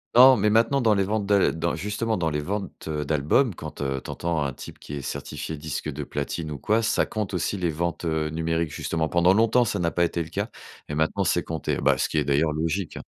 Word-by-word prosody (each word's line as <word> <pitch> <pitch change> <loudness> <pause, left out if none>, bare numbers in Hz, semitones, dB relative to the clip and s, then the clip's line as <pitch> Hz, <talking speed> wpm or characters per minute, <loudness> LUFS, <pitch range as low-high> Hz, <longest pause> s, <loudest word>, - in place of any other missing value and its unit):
non, 130 +2 +9
mais 105 +1 +2
maintenant 115 +5 +3
dans 110 -2 +4
les 100 - +2
ventes 105 +1 -1
d'a 100 -1 +3
dans 85 +1 -1
justement 105 +3 -2
dans 85 -5 0
les 75 -1 -1
ventes, 100 0 -5
heu, 75 -2 -2
d'albums, 80 - +2
quand, - - -8
heu, 65 -2 -2
tu - - -9
entends 85 -3 -1
un 70 -2 -2
type - - -10
qui - - -9
est 70 - -4
certifié 75 +3 -5
disque 75 0 -4
de - - -5
platine 80 -2 -4
ou 75 - -4
quoi, 110 - +2
ça 110 - +2
compte 105 -3 -3
aussi 90 +3 -1
les 90 -3 0
ventes, 85 +2 -3
heu, 80 -1 0
numériques 80 0 -1
justement. 80 0 -2
Pendant 85 +2 +4
longtemps, 115 +3 +4
ça 100 -2 -1
n'a 85 -1 +1
pas 85 0 +2
été 85 - -2
le 80 - -11
cas - - -3 0.4
mais 75 - -3
maintenant 80 +6 +1
c'est 85 -2 +1
compté. 80 -3 -2
Bah, - - +3
ce - - +1
qui 80 - -3
est - - +1
d'ailleurs 75 +3 +2
logique. 80 +3 -2
85 Hz, 245 wpm, -25 LUFS, 80-105 Hz, 0.4 s, non